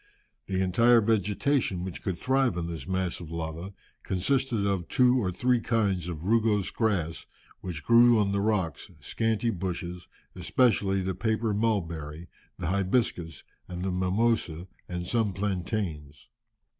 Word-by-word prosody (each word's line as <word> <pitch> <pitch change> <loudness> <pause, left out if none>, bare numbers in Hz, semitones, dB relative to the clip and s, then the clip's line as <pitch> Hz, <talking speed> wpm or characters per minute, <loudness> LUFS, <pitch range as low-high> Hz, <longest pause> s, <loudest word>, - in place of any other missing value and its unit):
The 95 -1 -1
entire 115 +6 +5
vegetation 105 -1 +1
which 95 -2 -6
could 95 -3 -3
thrive 130 -1 +1
on 85 - -2
this 80 -5 -6
mass 95 -1 -1
of 85 -3 -9
lava 85 +3 -5 0.3
consisted 115 +3 0
of 95 -4 -1
two 125 0 +4
or 90 -3 -1
three 125 +7 +2
kinds 100 -7 0
of 80 -2 -6
rugose 110 -2 +2
grass, 95 -8 -1 0.3
which 85 -5 -6
grew 120 0 +6
on 100 -2 +2
the 100 0 0
rocks, 95 - -1
scanty 115 +1 0
bushes, 90 -2 -5 0.3
especially 95 0 +2
the 95 0 -1
paper 110 +3 0
mulberry, 85 -7 -2 0.3
the 90 - -5
'hibiscus,' 95 -2 0 0.2
and 90 0 -5
the 95 - -1
mimosa, 90 -2 0 0.2
and 90 -1 -4
some 110 0 0
plantains. 90 - -3
95 Hz, 140 wpm, -28 LUFS, 90-110 Hz, 0.3 s, grew